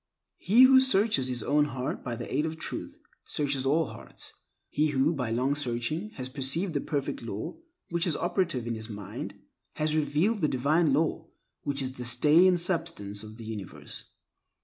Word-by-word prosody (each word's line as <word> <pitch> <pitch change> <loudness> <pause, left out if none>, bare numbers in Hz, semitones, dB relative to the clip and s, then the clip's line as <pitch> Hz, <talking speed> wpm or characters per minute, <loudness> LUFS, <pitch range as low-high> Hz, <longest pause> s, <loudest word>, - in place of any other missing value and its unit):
He 230 +7 +6
who 260 0 +8
searches 205 - +3
his 125 -1 -1
own 145 +1 +3
heart 130 -3 -4
by 120 -2 -3
the - - -6
aid 150 +3 +2
of 160 0 -5
Truth, - - -6 0.3
searches 140 -3 +1
all 160 +4 +3
hearts. - - -8 0.4
He 150 +1 +2
who, 145 +2 +2
by 125 -6 -2
long 125 +5 +1
searching, 145 - -1
has 130 -1 -3
perceived 145 +7 -1
the 145 - 0
Perfect 145 -3 -2
Law 115 - -5 0.3
which 170 +1 +1
is 160 - 0
operative 175 - 0
in 120 - -2
his 110 0 -6
mind, 105 -1 -6 0.4
has 155 0 0
revealed 155 +8 +1
the 155 - +3
Divine 145 +4 +2
Law 160 +3 0 0.3
which 140 -1 0
is 130 - -2
the 125 - -5
stay 150 +9 +5
and 180 -1 +4
substance 165 - -1
of 110 0 -10
the 115 - -9
universe. 105 -5 -7
145 Hz, 180 wpm, -28 LUFS, 125-165 Hz, 0.4 s, who